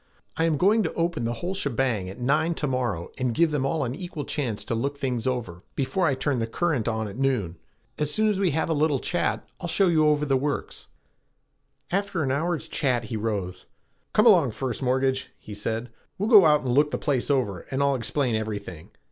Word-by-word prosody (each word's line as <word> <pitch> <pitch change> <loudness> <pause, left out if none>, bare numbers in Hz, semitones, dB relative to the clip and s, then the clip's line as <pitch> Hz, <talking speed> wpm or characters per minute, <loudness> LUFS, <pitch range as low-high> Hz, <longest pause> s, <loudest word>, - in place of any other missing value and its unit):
I 165 - +1
am 160 -3 +1
going 205 +8 +4
to 160 - -2
open 170 -7 -1
the 120 - -1
whole 175 +10 -3
shebang 125 - -1
at 95 - -9
nine 155 +7 +1
to 150 - -2
morrow 120 - -2
and 125 -3 0
give 170 -2 +3
them 140 -2 0
all 155 0 0
an 120 -1 -2
equal 160 -1 -6
chance 120 -9 -3
to 110 - -3
look 140 +5 -2
things 125 -4 -2
over 115 -9 -3
before 140 +7 0
I 140 - +2
turn 130 -1 -1
the 115 - -1
current 140 -2 0
on 110 -1 -1
at 100 +2 -8
noon. 110 -12 0 0.4
As 150 -1 0
soon 215 +7 +2
as 205 -3 +1
we 195 -2 +3
have 160 +1 0
a 165 - +1
little 150 -2 +2
chat, 175 - -1
I'll 175 - -4
show 185 +2 +3
you 155 -2 +4
over 150 0 +2
the 135 -2 +2
works." 145 +2 -3 1.0
After 195 -2 0
half - - 0
an 130 - 0
hour's 165 +4 -1
chat 125 -5 0
he 110 +1 -5
rose. 105 -4 -3 0.4
"Come 210 - +3
along, 170 - +6
First 130 0 -3
Mortgage," 130 0 0
he 105 - -10
said, 110 +3 -3 0.3
"we'll 205 +3 -1
go 205 -8 +8
out 150 -1 +4
and 125 -3 -1
look 145 +3 +4
the - - -2
place 135 -3 -1
over 120 -11 0
and 135 +1 0
I'll 140 0 +3
explain 130 0 -1
everything. 100 -7 -4
135 Hz, 220 wpm, -25 LUFS, 115-160 Hz, 1.0 s, go